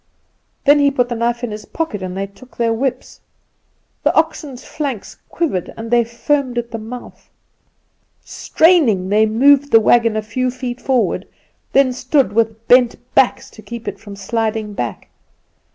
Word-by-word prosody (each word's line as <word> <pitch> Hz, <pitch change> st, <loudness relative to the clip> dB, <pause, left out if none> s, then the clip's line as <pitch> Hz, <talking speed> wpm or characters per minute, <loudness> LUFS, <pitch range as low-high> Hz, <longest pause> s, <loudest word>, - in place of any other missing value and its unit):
Then 290 Hz, +1 st, +6 dB
he 285 Hz, 0 st, +4 dB
put 250 Hz, -3 st, 0 dB
the 240 Hz, -, -2 dB
knife 235 Hz, +1 st, -1 dB
in 240 Hz, -, -3 dB
his 210 Hz, 0 st, -7 dB
pocket, 315 Hz, -12 st, -4 dB
and 185 Hz, 0 st, -5 dB
they 195 Hz, -, -2 dB
took 200 Hz, +6 st, -18 dB
their 230 Hz, -1 st, +1 dB
whips. 260 Hz, +3 st, -3 dB, 0.8 s
The -, -, +2 dB
oxen's 310 Hz, -5 st, -1 dB
flanks 275 Hz, -9 st, -5 dB
quivered, 195 Hz, -, -2 dB
and 225 Hz, +1 st, -7 dB
they 240 Hz, 0 st, +4 dB
foamed 250 Hz, +2 st, -1 dB
at 235 Hz, 0 st, -3 dB
the 225 Hz, -, -4 dB
mouth. 240 Hz, +3 st, -10 dB, 1.0 s
Straining, 270 Hz, -, +2 dB
they 215 Hz, +2 st, +3 dB
moved 280 Hz, +6 st, +4 dB
the 225 Hz, -, +7 dB
wagon 230 Hz, 0 st, +3 dB
a 215 Hz, -, -2 dB
few 255 Hz, +4 st, -2 dB
feet 250 Hz, -1 st, -6 dB
forward, 260 Hz, -3 st, 0 dB, 0.5 s
then 265 Hz, -2 st, +4 dB
stood 260 Hz, -3 st, +1 dB
with 225 Hz, 0 st, -1 dB
bent 245 Hz, -1 st, +5 dB, 0.2 s
backs 265 Hz, -2 st, +2 dB
to 215 Hz, -, -14 dB
keep 235 Hz, 0 st, -9 dB
it 200 Hz, -1 st, -5 dB
from 205 Hz, -2 st, -10 dB
sliding 220 Hz, +1 st, -2 dB
back. 120 Hz, -, -5 dB
235 Hz, 165 wpm, -18 LUFS, 220-260 Hz, 1.0 s, the